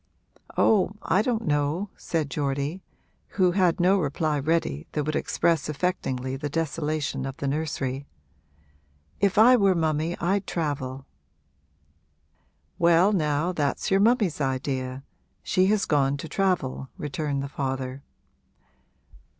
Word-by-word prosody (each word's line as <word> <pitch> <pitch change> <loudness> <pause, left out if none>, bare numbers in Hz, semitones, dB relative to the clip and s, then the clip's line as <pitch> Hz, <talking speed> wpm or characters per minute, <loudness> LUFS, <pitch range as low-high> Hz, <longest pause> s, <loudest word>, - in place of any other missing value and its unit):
'Oh, 200 -3 +3
I 190 - +2
don't 230 -1 -1
know,' 150 +6 0
said 155 -4 -2
Geordie, 145 +5 -2 0.6
who 185 -2 +4
had 180 -1 +2
no 190 +3 +4
reply 150 -1 0
ready 145 - -1
that 150 - 0
would 155 +1 -2
express 165 -2 +1
affectingly 135 -5 -2
the 145 0 -3
desolation 150 -2 -2
of 135 0 -5
the 140 - -3
nursery. 140 -2 -2 1.1
'If 200 -1 +1
I 240 +4 +8
were 200 -5 +3
mummy 160 +1 0
I'd 190 +2 0
travel.' 135 -5 -3 1.7
'Well 170 +4 +5
now 155 -1 +1
that's 150 -1 -1
your 195 - +4
mummy's 210 - +2
idea 130 -1 -2 0.4
she 185 0 +2
has 210 0 +2
gone 140 -2 +2
to 150 - -7
travel,' 165 -9 -1
returned 145 -1 -3
the - - -3
father. 135 -1 -4
155 Hz, 125 wpm, -26 LUFS, 140-180 Hz, 1.7 s, I